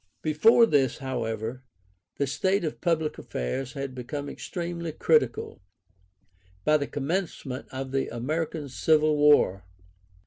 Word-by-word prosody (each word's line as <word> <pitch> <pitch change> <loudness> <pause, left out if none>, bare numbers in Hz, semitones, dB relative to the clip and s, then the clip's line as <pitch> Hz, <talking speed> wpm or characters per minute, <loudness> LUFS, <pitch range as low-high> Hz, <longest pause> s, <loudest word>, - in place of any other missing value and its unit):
Before 165 +10 +5
this, 135 - +2
however, 115 -2 -3 0.6
the 140 - +1
state 190 +8 0
of 155 - -4
public 160 -3 0
affairs 120 - -4
had 140 -2 -5
become 140 +3 -5
extremely 170 -1 -5
critical, 140 -10 +1 1.0
by 155 - +5
the 140 - -3
commencement 145 -3 -3
of 130 0 -5
the 135 0 0
American 150 +5 -3
civil 155 +3 +3
war. 145 -11 +4
145 Hz, 115 wpm, -27 LUFS, 130-160 Hz, 1.0 s, Before